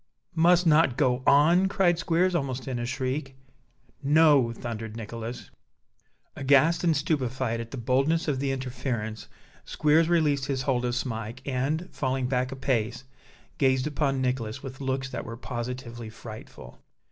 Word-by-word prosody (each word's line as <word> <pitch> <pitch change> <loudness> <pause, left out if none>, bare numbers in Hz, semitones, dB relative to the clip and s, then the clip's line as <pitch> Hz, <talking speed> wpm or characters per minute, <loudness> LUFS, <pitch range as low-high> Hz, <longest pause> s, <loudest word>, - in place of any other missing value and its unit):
"Must 175 +2 +4
not 155 -5 +4
go 130 -4 +2
on!" 165 +7 +5
cried 180 -4 +2
Squeers, 180 +1 +2
almost 135 -6 -2
in 125 -2 -2
a 120 - -3
shriek. 130 +1 -3 0.7
"No!" 145 -4 +5
thundered 115 -1 -6
Nicholas. 115 +2 -7 0.8
Aghast 140 +5 +3
and 165 -4 +3
stupefied 130 -6 -1
at 115 - -8
the 135 - -7
boldness 135 +8 +1
of 140 -3 0
the 135 0 0
interference, 125 -4 -4 0.4
Squeers 155 +2 +2
released 150 -5 +2
his 135 -2 -1
hold 125 -3 0
of 120 0 -1
Smike, 120 0 -4
and, 140 +6 -1
falling 130 -1 -1
back 125 0 0
a - - -5
pace, 120 -2 -1 0.6
gazed 130 -2 +3
upon 140 -3 0
Nicholas 125 -3 -2
with 130 0 -8
looks 130 0 -2
that - - -5
were 115 0 -7
positively 120 -1 -6
frightful. 110 0 -11
130 Hz, 145 wpm, -27 LUFS, 120-150 Hz, 0.8 s, on